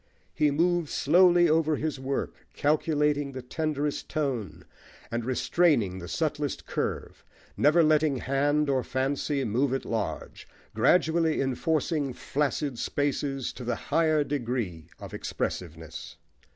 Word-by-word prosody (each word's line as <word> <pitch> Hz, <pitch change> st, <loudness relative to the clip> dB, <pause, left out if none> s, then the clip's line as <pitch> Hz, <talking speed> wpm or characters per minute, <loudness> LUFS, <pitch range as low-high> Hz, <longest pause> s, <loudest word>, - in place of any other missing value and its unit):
He 150 Hz, -, +2 dB
moves 170 Hz, +2 st, +1 dB
slowly 175 Hz, +2 st, +5 dB
over 155 Hz, -1 st, +2 dB
his 150 Hz, -2 st, -3 dB
work, 135 Hz, +1 st, -2 dB, 0.2 s
calculating 150 Hz, -1 st, +1 dB
the 130 Hz, -1 st, -6 dB
tenderest 150 Hz, +1 st, -2 dB
tone, 135 Hz, -9 st, -3 dB, 0.5 s
and 115 Hz, 0 st, -2 dB
restraining 125 Hz, -, +2 dB
the 90 Hz, -, -8 dB
subtlest 150 Hz, -, -2 dB
curve, -, -, -4 dB, 0.3 s
never 155 Hz, +4 st, +4 dB
letting 155 Hz, -2 st, +3 dB
hand 145 Hz, +4 st, +1 dB
or 135 Hz, -2 st, +1 dB
fancy 135 Hz, +2 st, -1 dB
move 125 Hz, +5 st, +1 dB
at 135 Hz, -, -4 dB
large, 110 Hz, -3 st, -4 dB, 0.3 s
gradually 160 Hz, +7 st, +3 dB
enforcing 145 Hz, +1 st, 0 dB
flaccid 140 Hz, -1 st, -2 dB
spaces 140 Hz, -2 st, -1 dB
to 125 Hz, -, -8 dB
the 120 Hz, -, -1 dB
higher 155 Hz, -2 st, +1 dB
degree 120 Hz, -, -3 dB
of -, -, -9 dB
expressiveness. -, -, -5 dB
145 Hz, 120 wpm, -27 LUFS, 130-155 Hz, 0.5 s, slowly